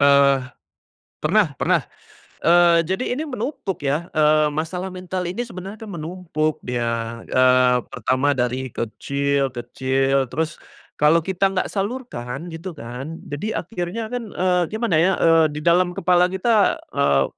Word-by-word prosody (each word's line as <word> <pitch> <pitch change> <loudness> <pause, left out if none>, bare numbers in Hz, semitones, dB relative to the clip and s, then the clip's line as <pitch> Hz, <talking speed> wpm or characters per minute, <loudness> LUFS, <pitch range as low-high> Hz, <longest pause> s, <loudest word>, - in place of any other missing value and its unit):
Eee, 140 -1 +5 0.8
pernah 180 +1 +2
pernah. - - +2 0.6
Eee, 170 0 +5
jadi 190 +7 -1
ini 305 - -2
menumpuk 230 - -4
ya, 150 +5 -1
eee, 155 -1 +4
masalah 165 +5 -3
mental 185 0 -4
ini 220 +7 -3
sebenarnya 195 -3 -8
kan 205 - -8
menumpuk 160 -2 -3
dia. 115 -1 -2
Eee, 130 -1 +4
pertama 130 +4 +1
dari 130 +1 -1
kecil 140 +4 -1
kecil 130 +2 0
terus 160 +2 -2 0.4
kalau 150 +3 +5
kita 190 +1 +1
nggak 185 - -1
salurkan 195 - -4
gitu 165 +1 -7
kan, 135 +6 -7
jadi 155 +10 -3
akhirnya 195 +4 -4
kan, 235 -4 -4
eee, 180 -1 +2
gimana 220 -6 0
ya, 185 +3 +4
eee, 165 -1 +5
di 150 - -5
dalam 175 +1 +3
kepala 180 -1 +3
kita, 200 +3 +2 0.2
eee, 140 - +3
165 Hz, 140 wpm, -22 LUFS, 135-185 Hz, 0.8 s, Eee